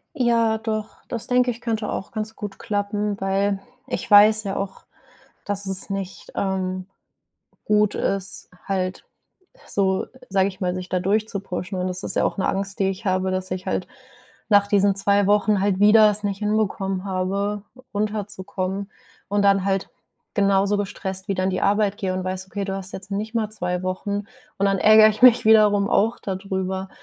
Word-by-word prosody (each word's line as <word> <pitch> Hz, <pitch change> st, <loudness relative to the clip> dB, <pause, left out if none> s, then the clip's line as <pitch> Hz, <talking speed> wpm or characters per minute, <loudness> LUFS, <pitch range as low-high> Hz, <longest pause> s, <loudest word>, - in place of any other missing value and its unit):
Ja, 230 Hz, -4 st, +2 dB
doch, 215 Hz, -1 st, -4 dB
das 235 Hz, -3 st, -3 dB
denke 250 Hz, 0 st, +2 dB
ich, 235 Hz, 0 st, -7 dB
könnte 220 Hz, -3 st, -2 dB
auch 190 Hz, -, -5 dB
ganz 215 Hz, 0 st, -5 dB
gut 205 Hz, -2 st, -7 dB
klappen, 205 Hz, -1 st, -2 dB
weil 195 Hz, +1 st, 0 dB, 0.3 s
ich -, -, -5 dB
weiß 215 Hz, +1 st, +7 dB
ja 195 Hz, -1 st, -3 dB
auch, 195 Hz, -1 st, -5 dB, 0.6 s
dass 200 Hz, -1 st, 0 dB
es 190 Hz, 0 st, +6 dB
nicht, 195 Hz, -1 st, -5 dB
ähm, 185 Hz, -1 st, -2 dB, 0.8 s
gut 210 Hz, -1 st, +2 dB
ist, 195 Hz, 0 st, -2 dB, 0.2 s
halt 185 Hz, -1 st, -2 dB, 0.6 s
so, 190 Hz, -1 st, 0 dB, 0.2 s
sage 195 Hz, 0 st, +2 dB
ich 190 Hz, +1 st, -11 dB
mal, 180 Hz, -1 st, -1 dB
sich 185 Hz, 0 st, -6 dB
da 180 Hz, -, -1 dB
durchzupushen. 195 Hz, -2 st, -2 dB
Und 180 Hz, 0 st, -1 dB
das 180 Hz, 0 st, -4 dB
ist -, -, -2 dB
ja -, -, +3 dB
auch -, -, -2 dB
'ne 190 Hz, -, 0 dB
Angst, 195 Hz, +1 st, -2 dB
die 195 Hz, -1 st, +2 dB
ich 195 Hz, +3 st, -7 dB
habe, 185 Hz, 0 st, +1 dB
dass 185 Hz, 0 st, -3 dB
ich 185 Hz, 0 st, -4 dB
halt -, -, -2 dB, 0.6 s
nach 205 Hz, -1 st, +5 dB
diesen 200 Hz, -1 st, +3 dB
2 200 Hz, 0 st, +2 dB
Wochen 205 Hz, 0 st, +3 dB
halt 195 Hz, -1 st, 0 dB
wieder 210 Hz, +1 st, +7 dB
es 210 Hz, +1 st, -2 dB
nicht 200 Hz, -1 st, -2 dB
hinbekommen 200 Hz, -3 st, -1 dB
habe, 200 Hz, +2 st, -2 dB, 0.3 s
runterzukommen, 200 Hz, -2 st, -3 dB, 0.4 s
und 205 Hz, 0 st, +1 dB
dann 195 Hz, -1 st, +3 dB
halt 195 Hz, -1 st, -1 dB, 0.4 s
genauso 200 Hz, 0 st, +2 dB
gestresst 190 Hz, -1 st, -5 dB
wieder 190 Hz, -2 st, -1 dB
an 190 Hz, -, +1 dB
die 185 Hz, -, -2 dB
Arbeit 205 Hz, 0 st, +2 dB
gehe 190 Hz, -3 st, -2 dB
und 185 Hz, -, -2 dB
weiß: 185 Hz, 0 st, -4 dB
„Okay, 200 Hz, 0 st, -4 dB
du 195 Hz, 0 st, -3 dB
hast 195 Hz, -1 st, -7 dB
jetzt 195 Hz, +1 st, -9 dB
nicht 215 Hz, +3 st, -4 dB
mal 220 Hz, -2 st, -1 dB
2 180 Hz, -4 st, -3 dB
Wochen.” 200 Hz, +2 st, -3 dB, 0.3 s
Und 200 Hz, -, +2 dB
dann 195 Hz, 0 st, +1 dB
ärgere 215 Hz, +2 st, +7 dB
ich 215 Hz, -, -8 dB
mich 245 Hz, -1 st, +7 dB
wiederum 210 Hz, -2 st, +5 dB
auch 225 Hz, +3 st, +2 dB
da 190 Hz, -2 st, -3 dB
drüber. 190 Hz, 0 st, -3 dB
200 Hz, 180 wpm, -23 LUFS, 190-210 Hz, 0.8 s, weiß